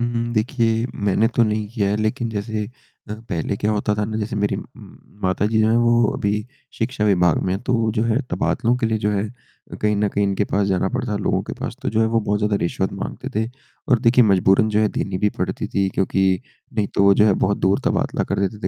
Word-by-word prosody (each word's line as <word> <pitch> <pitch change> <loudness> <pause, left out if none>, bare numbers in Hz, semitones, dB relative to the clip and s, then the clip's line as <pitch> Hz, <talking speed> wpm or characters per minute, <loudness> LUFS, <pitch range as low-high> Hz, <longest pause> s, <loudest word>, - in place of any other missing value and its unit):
हुँ, 120 - +1
हुँ, 120 0 -2
देखिए, 115 0 +1
मैंने 105 +2 +1
तो 120 - +5
नहीं 105 -1 0
किया 100 -4 +1
है, 105 - +1
लेकिन 110 +3 -1
जैसे 105 0 -3 0.4
अ, 105 - -4
पहले 100 -4 -4
क्या 105 +2 0
होता 105 0 0
था 105 0 -1
ना, 110 +1 -4
जैसे 105 0 -3
मेरी 105 0 0
उम, - - -6 0.6
माता 95 +2 +1
जी 110 +1 +1
जो 110 - +3
हैं, 115 - +3
वो 120 0 +4
अभी 100 - 0 0.5
शिक्षा 110 -2 -1
विभाग 90 -4 +3
में 90 - -1
हैं। 100 - -5
तो 125 - -1
वो, 115 -1 +1
जो 110 - 0
है, 115 +1 +2
तबादलों 120 +1 +1
के 120 - 0
लिए, 110 -1 0
जो 105 0 0
है 100 0 0 0.5
अ, - - -5
कहीं 105 0 0
न 105 0 +1
कहीं 100 0 0
इनके 100 +1 0
पास 100 0 0
जाना 95 -1 +1
पड़ता 125 -2 -3
है, 100 - -1
लोगों - - 0
के - - -7
पास। - - -4
तो - - -1
जो 110 +1 +1
है, 110 - +4
वो 115 0 +1
बहुत 105 0 0
ज़्यादा 105 -1 +1
रिश्वत 85 - -1
माँगते - - -5
थे, 110 - -1 0.4
और 125 -5 +4
देखिए, 125 0 +5
मजबूरन 95 +2 +4
जो 105 0 +1
है, 110 - +3
देनी 95 -1 -2
भी 105 +1 +2
पड़ती - - -2
थी, 100 -1 0
क्योंकि 95 0 +1 0.3
नहीं 105 -2 +1
तो - - +3
वो, 100 - +6
जो 105 +2 +4
है, 105 - +5
बहुत 100 - 0
दूर 95 +1 +2
तबादला - - 0
कर - - -1
देते 105 +2 -7
105 Hz, 255 wpm, -21 LUFS, 100-115 Hz, 0.6 s, वो